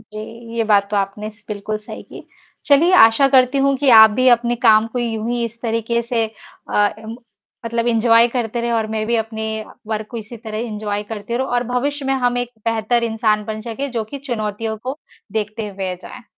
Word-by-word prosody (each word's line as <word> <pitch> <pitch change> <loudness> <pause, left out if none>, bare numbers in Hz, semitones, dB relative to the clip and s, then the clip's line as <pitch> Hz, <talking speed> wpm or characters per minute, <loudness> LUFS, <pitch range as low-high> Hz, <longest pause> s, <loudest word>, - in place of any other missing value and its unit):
जी, 230 +2 -10
ये 225 - +1
बात 200 -2 +3
तो 210 - 0
आपने 200 +2 -2
स 215 0 -25
बिल्कुल 210 +1 -3
सही 215 - -10
की। - - -13 0.4
चलिए 310 +6 +5
आशा 225 -2 +6
करती 260 0 +4
हूँ 275 0 +2
कि 280 -1 +1
आप 220 -1 +9
भी 255 +4 +2
अपने 240 0 +3
काम 220 -1 +6
को 250 - -2
यूँ 225 -1 -2
ही 240 -1 -1
इस 230 0 -7
तरीके 230 0 -1
से 230 -1 0 0.5
अ, 205 0 +4
इम 220 +1 -8 0.5
मतलब 230 0 -1
एन्जॉय 230 0 +4
करते 235 -1 -2
रहे 235 0 -2
और 225 -1 +1
मैं 215 -1 -1
भी 235 0 +1
अपने 220 0 -3 0.4
वर्क 215 -1 -3
को 235 - -6
इसी 225 +2 -8
तरह 220 -1 -6
एन्जॉय 210 -2 -3
करती 220 +2 -4
रहूँ 265 +2 -1
और 245 0 +1
भविष्य 270 +4 -2
में 270 - +1
हम 245 -2 0
एक 245 -1 -2 0.2
बेहतर 230 +1 +1
इंसान 220 -2 0
बन 215 0 -5
सकें, 245 +5 -5
जो 230 -2 -2
की 275 +6 -8
चुनौतियों 220 -4 -3
को 265 +4 -5 0.3
देखते 215 0 -3
हुए 190 -2 -4
जाये। 255 - -10
230 Hz, 210 wpm, -19 LUFS, 215-245 Hz, 0.5 s, आप